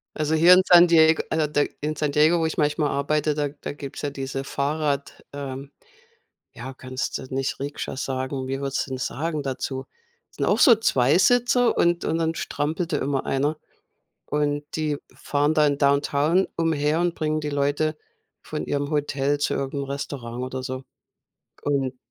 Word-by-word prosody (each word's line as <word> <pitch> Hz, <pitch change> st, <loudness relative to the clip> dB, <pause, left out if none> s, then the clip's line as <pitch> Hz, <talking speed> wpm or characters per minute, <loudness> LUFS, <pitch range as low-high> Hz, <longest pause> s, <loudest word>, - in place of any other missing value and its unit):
Also 155 Hz, +1 st, 0 dB
hier 170 Hz, +3 st, +7 dB
in 185 Hz, -, +7 dB
San 175 Hz, 0 st, +8 dB
Dieg 160 Hz, -1 st, +5 dB
also 155 Hz, -2 st, +1 dB
da 145 Hz, -1 st, +2 dB, 0.2 s
in 155 Hz, +1 st, -2 dB
San 150 Hz, -2 st, -1 dB
Diego, 155 Hz, +4 st, +4 dB
wo 160 Hz, -, +1 dB
ich 160 Hz, -, -3 dB
manchmal 150 Hz, 0 st, +1 dB
arbeite, 150 Hz, +2 st, 0 dB
da 145 Hz, -1 st, -1 dB
da 145 Hz, 0 st, -7 dB
gibt's 140 Hz, -2 st, -8 dB
ja 145 Hz, -, -1 dB
diese 135 Hz, -1 st, -5 dB
Fahrrad, 140 Hz, 0 st, -2 dB
ähm 140 Hz, 0 st, -6 dB, 0.8 s
ja 130 Hz, -, -8 dB
kannst 130 Hz, 0 st, -4 dB
du -, -, -8 dB
nicht 135 Hz, 0 st, -2 dB
Rikscha 140 Hz, -1 st, -5 dB
sagen? 130 Hz, 0 st, -3 dB
Wie 135 Hz, +1 st, -3 dB
würdest 140 Hz, 0 st, -2 dB
du -, -, -10 dB
denn 130 Hz, -, -3 dB
sagen 150 Hz, +4 st, -3 dB
dazu? 130 Hz, 0 st, -4 dB, 0.5 s
Sind -, -, -2 dB
auch -, -, +2 dB
so 250 Hz, -7 st, +8 dB
Zweisitzer 230 Hz, -, +3 dB
und 175 Hz, 0 st, +2 dB
und 160 Hz, -, 0 dB
dann 165 Hz, 0 st, 0 dB
strampelte 155 Hz, +2 st, -2 dB
immer 140 Hz, -1 st, -1 dB
einer. 145 Hz, +3 st, 0 dB, 0.7 s
Und 145 Hz, 0 st, 0 dB
die 155 Hz, -2 st, -1 dB, 0.2 s
fahren 145 Hz, +1 st, 0 dB
dann 150 Hz, -3 st, +3 dB
Downtown 145 Hz, +5 st, +2 dB
umher 160 Hz, -1 st, +1 dB
und 175 Hz, -1 st, 0 dB
bringen 155 Hz, -1 st, -1 dB
die 150 Hz, -, -3 dB
Leute 145 Hz, +2 st, 0 dB, 0.4 s
von 155 Hz, -, -5 dB
ihrem 145 Hz, 0 st, -2 dB
Hotel 145 Hz, -1 st, 0 dB
zu -, -, 0 dB
irgend 135 Hz, +1 st, -3 dB
'nem 140 Hz, -, -2 dB
Restaurant, 130 Hz, -3 st, -5 dB
oder 130 Hz, 0 st, -5 dB
so, 130 Hz, +1 st, -5 dB, 0.8 s
und 135 Hz, -3 st, -1 dB
145 Hz, 170 wpm, -24 LUFS, 140-155 Hz, 0.8 s, San